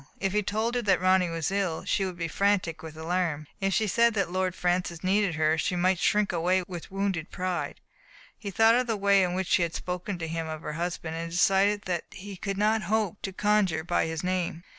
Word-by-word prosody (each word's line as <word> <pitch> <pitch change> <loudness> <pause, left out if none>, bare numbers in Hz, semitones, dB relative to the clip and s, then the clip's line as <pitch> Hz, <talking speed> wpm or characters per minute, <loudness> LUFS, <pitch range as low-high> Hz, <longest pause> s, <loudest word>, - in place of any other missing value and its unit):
If 195 -1 -1
he 210 - +2
told 220 +4 -1
her 245 - 0
that 205 -4 +2
Ronny 185 -1 +3
was 165 +1 -2
ill, 195 -5 -1
she 195 - +1
would 185 -2 -5
be 170 -1 -2
frantic 185 -2 0
with 160 -1 -9
alarm. 165 -2 -1
If 195 -1 0
he 220 - +2
said 235 +2 +3
that 195 -4 0
Lord 185 0 -1
Francis 175 -1 -1
needed 195 -1 +2
her, 155 0 +2
she 180 - 0
might 180 0 +2
shrink 210 0 +2
away 180 +2 +1
with 175 -3 -7
wounded 195 -4 -2
pride. 180 -1 -3 0.6
He 205 - -7
thought 225 +3 +5
of 250 +1 +2
the 225 -2 0
way 200 0 +4
in 180 -1 0
which 190 0 -1
she 175 - +2
had 170 -1 -1
spoken 180 +2 -4
to 165 -1 -4
him 165 0 -3
of 155 0 -6
her 150 - -4
husband, 165 0 -3
and 165 0 -4
decided 195 +4 +3
that 175 -2 -2
he 200 +1 -9
could 195 +2 -4
not 215 +2 +2
hope 215 -3 0
to 195 - -4
conjure 190 -5 +1
by 175 -1 0
his 160 0 -4
name. 180 -2 -2
185 Hz, 225 wpm, -27 LUFS, 170-200 Hz, 0.6 s, thought